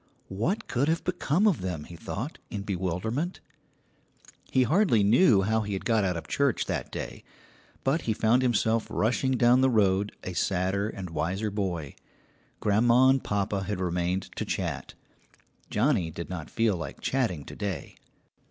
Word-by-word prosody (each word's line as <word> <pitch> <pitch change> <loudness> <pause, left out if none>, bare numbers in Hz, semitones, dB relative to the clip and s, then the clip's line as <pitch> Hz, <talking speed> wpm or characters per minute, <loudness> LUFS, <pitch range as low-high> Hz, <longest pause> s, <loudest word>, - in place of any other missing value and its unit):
What 115 - -1
could 130 +4 0
have 165 +1 +1
become 180 +1 +1
of 190 - +2
them, 90 -5 -3
he 85 - -11
thought, 120 - -5
in 100 -3 -4
bewilderment. 100 - -2 1.1
He 130 - +3
hardly 155 - +3
knew 105 - +5
how 110 +2 +1
he 105 -2 -2
got 110 +1 +1
out 90 -3 0
of 85 - -5
the - - -15
church 140 -4 +1
that - - -3
day, - - -6 0.6
but 145 +5 +1
he 110 - 0
found 115 +4 +3
himself 115 -2 +1
rushing 130 +4 +1
down 125 0 +4
the 130 - +4
road 100 -3 +2
a 95 - -5
sadder 95 +3 0
and 95 -4 -6
a - - -12
wiser 95 +7 -1
boy. 90 -8 -3 0.7
Grandma 120 +5 +4
and 135 0 +3
papa 100 -1 -1
had 105 -2 -3
remained 90 +1 -1
to - - -1
chat. - - -3 0.7
Johnnie 105 - +1
did 85 +3 -7
not 80 -4 -5
feel 115 -3 +1
like 85 - -6
chatting 110 - -1
to - - -9
day. 100 -4 -4
105 Hz, 165 wpm, -28 LUFS, 95-125 Hz, 1.1 s, knew